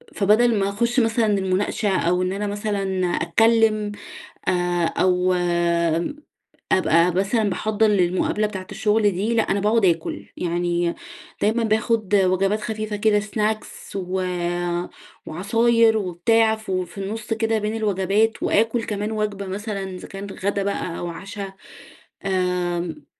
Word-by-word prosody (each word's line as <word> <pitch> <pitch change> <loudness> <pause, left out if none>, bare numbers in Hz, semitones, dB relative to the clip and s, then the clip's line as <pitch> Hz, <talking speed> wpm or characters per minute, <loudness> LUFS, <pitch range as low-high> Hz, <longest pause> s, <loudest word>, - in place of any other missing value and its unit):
فبدل 215 +2 +3
ما 195 - +1
أخش 235 +5 0
مثلًا 225 -1 +2
المناقشة 195 +2 0
أو 180 +2 +1
إن 185 0 0
أنا 205 +1 -2
مثلًا 205 0 -2 0.3
أتكلم 225 -2 +2 0.6
آآ 175 -1 +1
أو 185 +1 +2 1.4
أبقى 170 -1 +4
مثلًا 205 +3 +1
باحضّر 215 +3 +1
للمقابلة 200 +2 +1
بتاعة 190 -3 -7
الشغل 210 -1 +2
دي، 200 +5 -1
لأ، 225 - +3
أنا 200 - +1
باقعد 210 +1 +2
آكل. 165 -2 0
يعني 175 0 -1 0.5
دايمًا 225 +3 +2
باخد 220 -2 +1
وجبات 195 +2 +2
خفيفة 215 0 -3
كده 210 0 +3
سناكس 215 0 -3
و 185 0 -2 1.0
وعصاير 225 +6 +3
وبتاع 220 +4 +2
ف 220 -2 -8
في 185 0 -3
النص 215 +3 -3
كده 225 0 0
بين 210 +1 -2
الوجبات، 210 +1 +1
وآكل 225 +2 +2
كمان 210 0 -3
وجبة 210 -2 -2
مثلًا 200 +1 -4
إذا 180 - -9
كان 195 +1 -7 0.2
غدا 200 0 0
بقى 190 -3 -3
أو 175 - -4
عشا. 195 +3 -7 0.7
آمم، 180 -4 -1
205 Hz, 130 wpm, -22 LUFS, 185-220 Hz, 1.4 s, أبقى